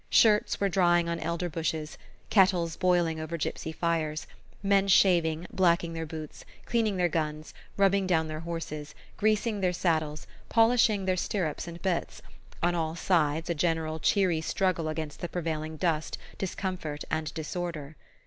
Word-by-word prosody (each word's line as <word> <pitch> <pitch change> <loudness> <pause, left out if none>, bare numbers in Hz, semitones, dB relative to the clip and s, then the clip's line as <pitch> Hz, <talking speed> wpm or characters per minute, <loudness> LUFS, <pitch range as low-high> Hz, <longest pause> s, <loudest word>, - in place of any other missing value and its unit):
Shirts 210 -2 +4
were 200 - +2
drying 175 -3 +3
on 170 0 -2
elder 170 +1 -2
bushes, 160 -1 -3 0.4
kettles 180 -5 +4
boiling 175 -3 +2
over 160 +2 -4
gypsy 160 +1 -3
fires, 160 -2 -1 0.4
men 200 0 +3
shaving, 175 -4 +4
blacking 170 -2 +2
their 165 -1 -4
boots, 155 -1 -8 0.2
cleaning 220 -4 +1
their 180 -1 +3
guns, 155 -2 -3 0.2
rubbing 195 -1 +3
down 160 -3 +2
their 155 0 -5
horses, 165 -3 -6 0.2
greasing 215 0 +1
their 180 -1 +2
saddles, 155 -4 0 0.2
polishing 225 -3 +4
their 185 -1 +1
stirrups 175 -4 -2
and 170 0 -9
bits: 185 -3 -2 0.4
on 175 0 +3
all 160 -1 -1
sides 165 -3 +1
a 170 - +1
general 160 -1 -1
cheery 180 -2 +2
struggle 175 -1 0
against 155 -1 -4
the 175 - -4
prevailing 160 -2 -3
dust, 160 -2 -1 0.2
discomfort 185 -6 -3
and 155 -1 -1
disorder. 160 -2 -4
170 Hz, 150 wpm, -28 LUFS, 155-185 Hz, 0.4 s, Shirts